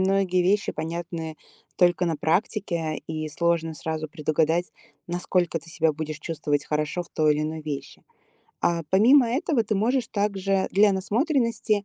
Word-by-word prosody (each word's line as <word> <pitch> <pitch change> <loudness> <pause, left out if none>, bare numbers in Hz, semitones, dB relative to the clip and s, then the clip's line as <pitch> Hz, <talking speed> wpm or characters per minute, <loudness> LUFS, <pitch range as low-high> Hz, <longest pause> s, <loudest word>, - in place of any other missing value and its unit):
многие 190 -1 +2
вещи 200 +3 +1
понятны 165 0 -5 0.4
только 180 0 +3
на 165 -2 0
практике, 165 -1 -1
и 155 -1 -4
сложно 165 0 0
сразу 155 0 -4
предугадать, 160 +1 0 0.4
насколько 175 -1 0
ты 165 +1 -14
себя 160 -1 +1
будешь 155 0 -5
чувствовать 145 -3 -2
хорошо 150 +3 -1
в - - -17
той 155 -1 +3
или 150 - -1
иной 155 +1 -3
вещи. 145 -2 -6 0.6
А 170 -1 +1
помимо 235 +6 +6
этого, 260 0 +1
ты 215 - -1
можешь 240 +4 +1
также 195 -2 0
для 205 +1 +5
насмотренности 230 - 0
175 Hz, 145 wpm, -25 LUFS, 155-200 Hz, 0.6 s, помимо